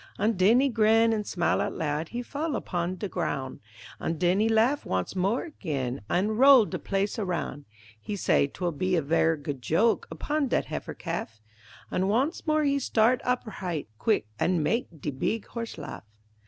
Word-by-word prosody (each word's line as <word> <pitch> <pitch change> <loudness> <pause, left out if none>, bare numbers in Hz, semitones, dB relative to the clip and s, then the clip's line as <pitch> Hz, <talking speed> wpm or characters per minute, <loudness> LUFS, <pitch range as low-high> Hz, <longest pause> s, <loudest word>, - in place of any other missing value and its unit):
An' 210 +3 +2
den 215 +5 +4
he 280 - +3
grin 225 -1 +4
an' 210 -1 -2
smile 175 -3 0
out - - -2
loud, 155 +1 -2
He 245 +1 -4
fall 290 +3 -3
opon 175 +1 -3
de 205 - -3
groun', 130 -7 -3 0.4
An' 165 - -2
den 180 +4 +2
he 220 +1 +3
laugh 230 +6 +3
wance 95 - -2
mor' 195 +7 +1
again 140 - -4
An' 210 +5 +1
roll 265 -3 +8
de - - -5
place 200 +3 -1
aroun': 170 -7 -3 0.4
He 205 - -4
say, 160 -6 +2
'twill 175 +4 -3
be 185 +4 0
a 165 - +1
ver' 165 +2 +2
good 145 -3 -6
joke 210 - +2
Opon 300 -1 -1
dat - - 0
heifer - - -5
calf, 110 -1 -5 0.5
An' 185 +1 0
wance 265 - 0
mor' 310 0 +3
he 280 -1 +2
start 245 -1 +2
op 250 0 0
h'right 180 -7 -4
quick 215 - +1
An' 175 -3 +1
mak' 230 +10 0
de 145 - -3
beeg 200 +11 -2
horse 230 -1 -6
laugh. 105 - -8
200 Hz, 185 wpm, -27 LUFS, 165-235 Hz, 0.5 s, roll